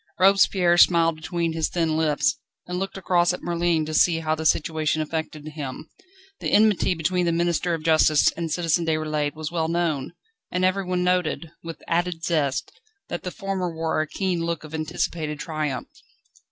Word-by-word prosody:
Robespierre 185 -2 +4
smiled 165 -2 +5
between 165 +1 -2
his 160 -1 0
thin 165 -3 0
lips, 155 -2 +1 0.3
and 180 0 -4
looked 195 0 -4
across 175 -2 +2
at - - -7
Merlin 170 -2 +1
to 155 - -5
see 165 +1 +3
how 155 -1 0
the 160 0 0
situation 155 0 +1
affected 155 -1 -4
him. 145 -4 -7 0.5
The - - -2
enmity 210 -4 +4
between 175 +2 0
the - - +3
Minister 170 +1 0
of 160 - -8
Justice 155 -2 +4
and 165 -2 -5
Citizen 170 0 +1
Déroulède 155 -2 -1
was 155 0 -5
well 165 -2 0
known, 165 -4 -1 0.4
and 180 +1 0
everyone 185 -1 0
noted, 180 -3 0
with 165 -2 -8
added 170 -1 -1
zest, 145 -6 0 0.4
that 175 - -4
the 180 - -4
former 195 -2 -3
wore 160 -1 -1
a 155 - -3
keen 180 -1 -2
look 165 -2 -3
of 155 0 -11
anticipated 155 -1 -2
triumph. 150 -4 -3
165 Hz, 170 wpm, -24 LUFS, 155-175 Hz, 0.5 s, smiled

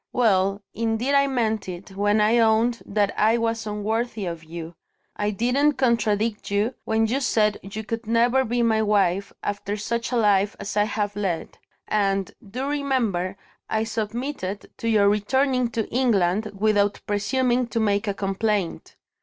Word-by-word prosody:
Well, 200 -4 +2
indeed 230 +4 -1
I 280 0 +4
meant 220 -6 -1
it, 180 +2 -8
when 205 +2 +2
I 220 +3 +4
owned 230 +1 +3
that 205 0 +1
I 220 +2 +4
was 230 -1 -1
unworthy 215 +1 -2
of 170 -2 -5
you. 165 +1 -8 0.4
I 205 - -1
didn't 250 +8 +2
contradict 225 -4 0
you, 205 +5 +1
when 220 0 +2
you 245 +5 0
said 215 -5 +1
you 210 +3 -6
could 230 +1 -5
never 240 +3 +3
be 240 0 0
my 220 -1 +3
wife, 200 -2 +1
after 205 0 -3
such 235 +3 -2
a - - 0
life 205 -2 +3
as 200 0 -5
I 210 0 +3
have 205 -1 -2
led. 190 -5 -3 0.3
And, 195 -2 0
do 245 +7 -5
remember, 240 -11 -1 0.3
I 220 0 +1
submitted 220 -1 -4
to 230 - -2
your 210 -3 +4
returning 250 +5 +2
to 225 -2 -2
England, 215 -5 +1
without 205 -1 +2
presuming 245 +4 +1
to 230 - -2
make 205 -1 +1
a 200 - -1
complaint. 195 -2 -2
215 Hz, 160 wpm, -24 LUFS, 200-235 Hz, 0.4 s, I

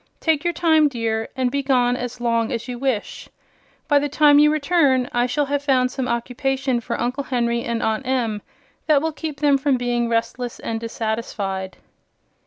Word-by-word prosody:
Take 320 -2 +1
your 345 - +1
time, 320 -2 +3
dear, 225 -3 -2
and 255 -1 0
be 280 - 0
gone 250 -3 +2
as 245 0 -5
long 230 -1 0
as 235 0 -4
you 245 -1 -5
wish. 260 -5 -3 0.6
By 290 -2 +4
the 290 +1 -2
time 290 0 +5
you 300 0 +5
return 285 -4 +2
I 240 0 +2
shall 290 +4 0
have 285 0 -1
found 255 -3 +2
some 260 -1 -3
occupation 255 +2 -1
for - - -4
Uncle 255 +4 -2
Henry 235 -2 0
and 235 0 -2
Aunt 220 +4 -1
Em 235 -5 -1 0.5
that 300 -2 +4
will 320 - 0
keep 305 -2 -6
them 285 -2 +4
from 270 -1 +2
being 240 -1 -1
restless 235 +1 -2
and 225 0 -3
dissatisfied." 220 -4 -4
255 Hz, 185 wpm, -21 LUFS, 235-285 Hz, 0.6 s, time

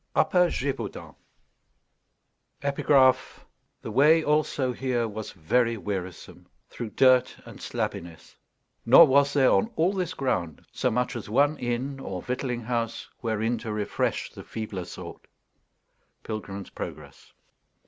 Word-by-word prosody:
UPPER 180 -2 +4
GÉVAUDAN 135 -9 -4 1.5
_The 140 0 -1 1.2
way 155 +6 +5
also 145 -4 +1
here 120 -2 -1
was 110 0 -6
very 115 +7 +1
wearisome 95 -4 -6 0.2
through 120 -2 -6
dirt 130 +2 +3
and - - -12
slabbiness; 85 -2 -5 0.5
nor 130 +8 +9
was 140 0 +3
there 135 -3 +4
on 225 - +2
all 175 +5 +2
this 185 -2 -3
ground 90 - -2
so 125 - 0
much 125 +2 -1
as 115 -3 -6
one 145 +7 +3
inn 125 +3 -3
or 95 -8 -5
victualling 125 -1 -3
house 115 0 -3
wherein 115 0 -1
to 110 -1 -5
refresh 105 -1 -2
the - - -11
feebler 105 -5 -6
sort._ 85 - -10 1.0
PILGRIM'S 100 -3 -6
PROGRESS. - - -9
120 Hz, 120 wpm, -26 LUFS, 110-140 Hz, 1.5 s, nor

